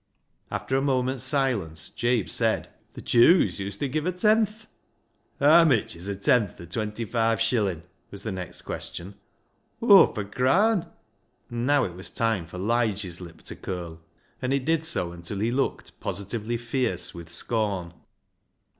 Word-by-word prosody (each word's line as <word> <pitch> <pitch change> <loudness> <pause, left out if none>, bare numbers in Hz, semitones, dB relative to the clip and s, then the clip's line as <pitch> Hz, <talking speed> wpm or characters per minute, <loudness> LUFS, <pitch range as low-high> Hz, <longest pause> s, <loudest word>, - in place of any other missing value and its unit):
After 130 - -2
a 135 - +2
moment's 130 -2 0
silence, 110 - 0
Jabe 120 -4 0
said - - 0
— - - -37
" - - -39
Th' - - -7
Jews 140 - +5
uset 100 +7 -3
give 155 +3 -1
a - - +2
tenth." 215 +3 +2 0.4
" - - -43
Haa 155 +4 +7
mitch 135 -10 +2
is 85 +3 -6
a 100 - -2
tenth 100 +1 +1
o' 85 - -8
twenty 105 +5 -3
five 115 0 +1
shillin'? 105 -8 +1
" - - -42
was 100 - -9
the 110 - -3
next 90 -2 -6
question. 90 +4 -6 0.3
" - - -44
Hawf 205 - +7
a 105 - -2
craan." 175 - +2 0.6
And 120 +1 -2
now 145 -1 +4
it 90 - -3
was 95 +2 -7
time 110 -7 -1
for 90 - -9
Lige's 105 -4 0
lip 85 -2 -11
to - - -6
curl, 85 -3 -6 0.4
and 130 0 -1
it 135 -2 0
did 160 0 +1
so 120 - -2
until 85 +3 -6
he 110 +4 0
looked 135 +2 -2
positively 110 +3 -3
fierce 120 -5 -2
with 85 -1 -10
scorn. 95 -1 -2
115 Hz, 170 wpm, -26 LUFS, 95-135 Hz, 0.6 s, Haa